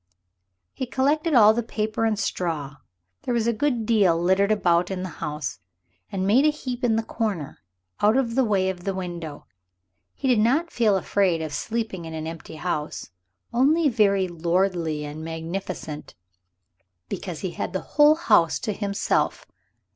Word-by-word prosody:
He 260 - -4
collected 295 +5 +1
all 215 -2 +8
the 235 - 0
paper 220 0 -2
and 220 -2 +1
straw 155 -8 -3 0.4
there 245 - -2
was 230 -2 +1
a 235 - +2
good 240 -1 0
deal 200 -7 +3
littered 190 +4 +2
about 180 -4 +2
in 185 -1 -3
the 185 - -4
house 150 - -4 0.5
and 190 -1 -2
made 225 +8 +4
a 305 - +5
heap 255 -5 -5
in 230 -2 +3
the 225 - 0
corner, 205 - -3 0.4
out 215 +4 +4
of 240 -4 0
the 265 +2 +3
way 200 -5 +1
of 180 -2 -11
the 195 0 -2
window. 170 -5 -6 0.7
He 275 - -3
did 245 -4 +4
not 280 +10 +2
feel 215 -5 +3
afraid 190 -2 +1
of 155 -2 -5
sleeping 220 -6 -3
in 160 0 -6
an 155 0 -4
empty 160 -1 -8
house, 155 - -4 0.4
only 290 +6 +4
very 200 -5 +2
lordly 170 -2 0
and 150 +2 -7
magnificent 165 -1 -6 0.9
because 175 - -5
he 185 - -3
had 180 - -5
a 190 - 0
whole 295 +1 +5
house 315 - +3
to 215 - -2
himself. 200 -1 -1
195 Hz, 165 wpm, -24 LUFS, 170-235 Hz, 0.9 s, all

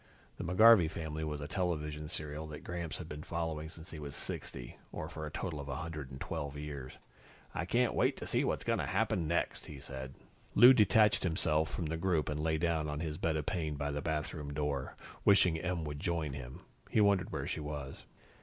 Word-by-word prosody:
The - - -4
McGarvey 95 0 +7
Family 80 -1 -4
was 75 -1 -3
a 70 - -4
television 75 -3 -2
serial 75 -1 -3
that 75 -1 -8
Gramps 85 -3 -4
had - - -7
been 75 0 -6
following 80 -1 -3
since 80 0 -11
he 80 - -7
was 70 -2 -6
60, - - -6
or 80 - -4
for 80 -1 -6
a - - -7
total 80 -1 -3
of 70 - -6
112 75 0 -4
years. 70 -3 -6 0.6
"I 80 - -2
can't 120 +6 +2
wait - - +2
to - - -6
see - - +1
what's - - 0
going - - +1
to - - -1
happen 85 -4 +1
next," 85 +2 -1
he 70 - -8
said. 65 -1 -7 0.4
Lou 125 +4 +10
detached 105 -2 +5
himself 80 -2 +1
from 85 - -3
the 80 +1 -2
group 85 -3 +1
and 75 0 -2
lay 80 +1 +1
down 80 -2 0
on 75 0 -3
his 80 -1 -3
bed 80 -1 +1
of 75 - -2
pain 80 -4 -1
by 70 0 -2
the 75 0 -2
bathroom 75 -2 -3
door. 75 -3 -2 0.3
Wishing 90 -5 +5
Em 90 -1 -1
would 75 -1 -4
join 80 -4 -1
him, 65 -2 -7 0.3
he - - +2
wondered 100 -3 +4
where - - -2
she - - -2
was. 75 -2 -6
80 Hz, 205 wpm, -33 LUFS, 75-85 Hz, 0.6 s, Lou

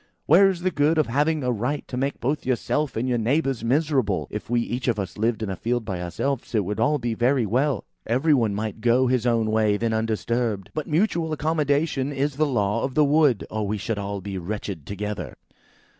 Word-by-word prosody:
"Where 190 +6 +6
is 180 -3 -3
the 185 +1 +1
good 155 +1 +2
of 155 - +4
having 145 +4 +1
a 125 - +1
right 125 +6 -2
to - - -6
make 135 +2 -2
both 140 +5 -1
yourself 130 +3 -1
and 120 +3 -1
your 125 -2 +1
neighbours 135 +1 0
miserable? 130 - +1
If 105 - -6
we 120 0 +2
each 120 +2 -3
of 120 -3 +2
us 95 -3 -4
lived 110 +1 0
in 105 - -3
a - - -3
field 120 +3 -2
by 95 -4 -4
ourselves, 120 +9 -3
it 105 -3 +2
would 105 +2 -3
be - - -1
all 150 +1 +3
very 120 +1 +1
well. 130 +3 +1 0.2
Every 135 +7 +3
one 115 -7 +2
might 110 +1 -4
go 120 +3 +3
his 125 -1 +1
own 115 -2 +2
way 110 -2 +2
then 115 +1 -1
undisturbed. 110 -2 -1
But 155 - -3
mutual 165 -1 +1
accommodation 150 -2 0
is 140 0 -1
the 155 0 +2
law 105 -4 0
of 130 -1 -3
the 150 - +5
wood, 145 -6 +3
or 110 -1 -2
we 105 +1 -1
should 105 +1 -3
all 100 0 -4
be 95 0 -5
wretched 95 -4 -5
together." 105 +1 -5
120 Hz, 220 wpm, -24 LUFS, 110-145 Hz, 0.2 s, Where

